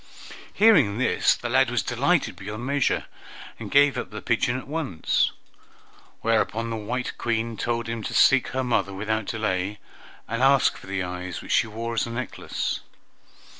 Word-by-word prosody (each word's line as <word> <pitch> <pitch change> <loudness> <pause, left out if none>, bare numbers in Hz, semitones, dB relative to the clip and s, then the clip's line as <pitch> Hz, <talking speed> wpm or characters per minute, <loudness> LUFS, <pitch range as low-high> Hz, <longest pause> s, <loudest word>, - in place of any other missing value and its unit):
Hearing 160 - +5
this, 130 - +3
the 120 - -5
lad 130 +1 +3
was 125 -1 0
delighted 140 - +1
beyond 105 +5 -6
measure, 140 0 +1 0.5
and - - -6
gave 145 0 +4
up - - -5
the - - -7
pigeon 120 +1 0
at 130 - -8
once. 145 - 0 0.9
Whereupon 115 0 0
the - - -2
white 125 +4 -3
Queen 115 0 -1
told 120 +1 -2
him 115 -1 -3
to - - -4
seek 135 -1 +5
her 130 0 -2
mother 100 -6 0
without 110 +2 -2
delay, 100 -2 -2 0.5
and 115 +2 -3
ask 135 +1 +4
for - - -13
the 95 -1 -2
eyes 90 0 -5
which - - -7
she - - +3
wore 115 +2 -5
as 115 - 0
a - - -6
necklace. 120 +2 -3
115 Hz, 170 wpm, -25 LUFS, 105-130 Hz, 0.9 s, Hearing